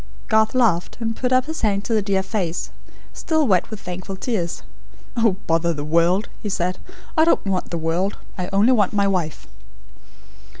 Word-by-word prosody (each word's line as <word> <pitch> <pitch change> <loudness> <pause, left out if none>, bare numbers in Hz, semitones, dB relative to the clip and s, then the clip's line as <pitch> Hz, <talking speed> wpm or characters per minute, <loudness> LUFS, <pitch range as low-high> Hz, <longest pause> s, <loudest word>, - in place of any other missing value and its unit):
Garth 220 +2 +3
laughed, 210 -9 +2
and 225 -1 -2
put 250 +1 -1
up 255 0 +4
his 320 +1 -5
hand 200 -2 +1
to 230 - -1
the 215 - +3
dear 195 -1 0
face, 185 -5 -2 0.4
still 315 -2 +1
wet 185 -7 +2
with 220 -2 -6
thankful 185 +1 -6
tears. 190 -5 -2 0.5
"Oh, 225 -5 +3
bother 165 0 +1
the 145 0 -4
world!" 170 +6 +2
he 210 - -3
said. 180 -1 -1 0.4
"I 315 - +5
don't 330 - +3
want 190 -2 -1
the 170 - -2
world. 165 +5 -1 0.2
I 180 0 -4
only 205 +6 +4
want 210 -6 +3
my 200 -1 +2
wife." 180 -6 -2
195 Hz, 180 wpm, -22 LUFS, 175-225 Hz, 0.5 s, I